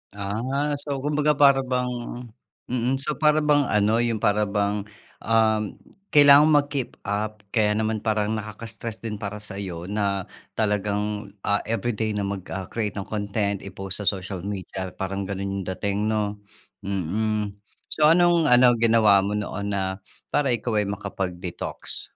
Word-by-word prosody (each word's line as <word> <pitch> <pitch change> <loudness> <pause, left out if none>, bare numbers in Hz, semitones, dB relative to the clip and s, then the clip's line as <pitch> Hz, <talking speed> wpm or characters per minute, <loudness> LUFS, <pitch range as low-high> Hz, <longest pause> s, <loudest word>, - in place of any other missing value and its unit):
Ah, 125 +9 -2
so 140 -2 -4
kumbaga 150 0 +2
para 140 -1 +6
bang 125 -1 0 0.8
mm 125 +1 +1
so 150 +2 -2
para 150 0 +4
bang 145 -1 +4
ano 105 +2 +2
yung 115 -2 0
para 105 +1 +3
bang 100 0 0 0.4
um, 110 -1 +3 0.5
kailangan 145 0 +8
mag-keep 145 -3 +1
up 105 +1 -2
kaya 105 -3 +3
naman 110 0 0
parang 110 -1 +1
nakaka-stress 110 +1 -5
din 110 -2 -3
para 105 0 -4
saiyo 95 -5 -5
na 100 -2 -1 0.3
talagang, 105 0 -1 0.2
ah, 100 0 +2
everyday 115 -1 -1
na 100 - -1
mag 100 0 -2 0.2
ah, 95 -1 -4
create 105 -4 -2
ng 100 - -3
content 100 -1 -1
i-post 95 0 -6
sa - - -5
social 95 -1 -1
media 95 -2 -5
parang 95 0 -3
ganun 100 0 -3
yung 95 - -5
dating 100 +1 -1
no? 105 -1 -1 0.5
Mm. 105 +3 -1 0.4
So 150 -1 +4
anong 170 -1 +5
ano 125 -1 +6
ginawa 110 -3 +5
mo 100 +2 -1
noon 100 -1 -3
na 95 0 -2 0.3
para 140 -3 +2
ikaw 110 -2 -1
ay 105 - 0
makapag-detox? 95 -3 -4
105 Hz, 150 wpm, -24 LUFS, 100-120 Hz, 0.8 s, kailangan